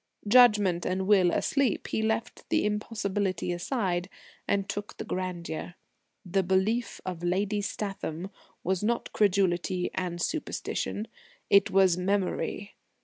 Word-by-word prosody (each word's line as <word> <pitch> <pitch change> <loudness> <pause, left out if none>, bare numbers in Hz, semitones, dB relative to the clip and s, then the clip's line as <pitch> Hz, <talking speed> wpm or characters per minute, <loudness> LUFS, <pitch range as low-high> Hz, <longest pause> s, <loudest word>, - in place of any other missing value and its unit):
Judgment 210 -7 +5
and 190 +1 -1
will 190 -3 +5
asleep, 270 +3 0
he - - 0
left 225 +2 -2
the - - +2
impossibility 205 -4 -1
aside, 180 -1 -1 0.4
and 200 -1 +1
took 205 +1 -5
the - - -5
grandeur. 175 -2 -4 0.5
The 190 +2 +1
Belief 190 +6 0
of 180 -3 -4
Lady 200 +4 0
Statham 195 -3 -4 0.3
was 190 +2 0
not 235 +2 -1
credulity 185 -2 +1
and 175 -2 -3
superstition; 225 - -2 0.4
it 200 -1 +6
was 190 -2 +4
Memory. 195 +1 -1
195 Hz, 120 wpm, -28 LUFS, 180-210 Hz, 0.5 s, it